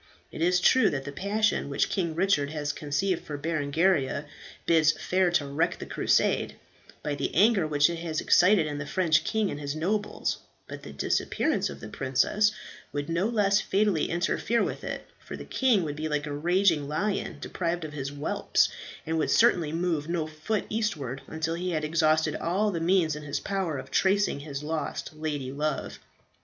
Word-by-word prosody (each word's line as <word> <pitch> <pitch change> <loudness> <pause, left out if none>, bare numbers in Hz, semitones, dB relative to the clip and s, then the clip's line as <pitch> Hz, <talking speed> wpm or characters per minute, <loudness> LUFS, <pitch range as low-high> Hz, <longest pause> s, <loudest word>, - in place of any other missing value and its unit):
It - - -7
is 180 +1 +3
true 260 +8 +5
that 135 -2 -3
the 145 - -5
passion 205 +1 0
which 140 - 0
King 170 -4 -1
Richard 170 -5 +2
has 150 -1 -3
conceived 160 +5 -1
for 145 - -6
Berengaria 155 0 0 0.4
bids 155 -2 +4
fair 185 +3 +1
to 145 - +2
wreck 140 +4 0
the - - -7
Crusade, - - +1 0.5
by 150 - -1
the 145 - -2
anger 200 -3 +4
which 145 -1 +4
it 170 -1 -3
has 165 -2 -3
excited 180 -2 +4
in 145 -1 -4
the 145 - -5
French 170 -1 +2
king 220 -3 0
and 145 - -5
his 145 0 -4
nobles; 205 +6 -1 0.3
but - - -8
the 75 - -9
disappearance 70 - 0
of - - -9
the - - -7
princess 135 +11 +1 0.4
would 145 +1 -4
no 170 +5 +1
less 210 -3 +2
fatally 200 -5 +1
interfere 175 +6 0
with - - -4
it, - - -5
for - - -8
the - - -9
king 245 -8 +2
would 150 -2 -4
be 155 +1 -2
like 150 0 -1
a 145 - -4
raging 170 -1 +2
lion 195 +7 -2
deprived 170 -1 -3
of 150 - -8
his 140 -2 -4
whelps, 145 0 +1 0.4
and 160 0 -1
would - - 0
certainly 180 -10 +4
move 165 -2 -1
no 170 -2 0
foot 155 +7 -3
eastward 155 - -2
until 160 +1 -2
he 180 +2 -3
had 155 -1 -1
exhausted 155 0 +2
all 200 +5 0
the 170 - -2
means 170 -3 +2
in 150 - -7
his 145 -1 -3
power 190 -7 -2
of - - -8
tracing 195 -4 +2
his 145 -1 -6
lost 155 0 -4
lady 150 -4 -4
love. 150 +1 -3
160 Hz, 185 wpm, -27 LUFS, 150-190 Hz, 0.5 s, true